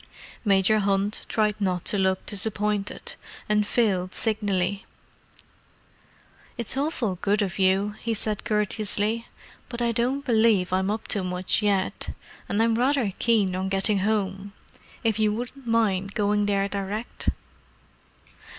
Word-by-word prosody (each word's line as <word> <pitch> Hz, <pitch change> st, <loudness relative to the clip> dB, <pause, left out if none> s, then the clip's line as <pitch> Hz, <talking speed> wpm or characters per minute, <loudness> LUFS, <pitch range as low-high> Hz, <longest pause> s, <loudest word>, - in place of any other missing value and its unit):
Major 200 Hz, 0 st, +3 dB
Hunt 200 Hz, +1 st, 0 dB
tried 215 Hz, -1 st, +2 dB
not 180 Hz, -3 st, 0 dB
to 205 Hz, -, +3 dB
look 190 Hz, 0 st, +1 dB
disappointed, 210 Hz, 0 st, -1 dB, 0.3 s
and 210 Hz, -1 st, +2 dB
failed 190 Hz, -6 st, +1 dB
signally. 200 Hz, -3 st, -1 dB, 1.7 s
"It's 235 Hz, 0 st, -1 dB
awfully 265 Hz, -, -1 dB
good 205 Hz, +1 st, +2 dB
of 195 Hz, -1 st, -4 dB
you," 190 Hz, +2 st, +3 dB
he 230 Hz, -1 st, -1 dB
said 210 Hz, 0 st, -2 dB
courteously. 210 Hz, +1 st, 0 dB, 0.4 s
"But 240 Hz, -1 st, -6 dB
I 235 Hz, -1 st, +2 dB
don't 255 Hz, +5 st, 0 dB
believe 220 Hz, -6 st, +3 dB
I'm 190 Hz, +1 st, +1 dB
up 215 Hz, +1 st, -3 dB
to 200 Hz, -, +1 dB
much 180 Hz, +3 st, 0 dB
yet—and 200 Hz, +1 st, -2 dB
I'm 230 Hz, 0 st, +3 dB
rather 245 Hz, -3 st, +1 dB
keen 210 Hz, -6 st, +2 dB
on 190 Hz, +1 st, -2 dB
getting 195 Hz, +1 st, +3 dB
home. 200 Hz, -1 st, -1 dB, 0.5 s
If 225 Hz, -2 st, +1 dB
you 215 Hz, -1 st, +3 dB
wouldn't 245 Hz, +2 st, -7 dB
mind 200 Hz, -4 st, +1 dB
going 205 Hz, 0 st, +1 dB
there 200 Hz, -1 st, +1 dB
direct." 200 Hz, +3 st, -3 dB
205 Hz, 130 wpm, -25 LUFS, 195-225 Hz, 1.7 s, Major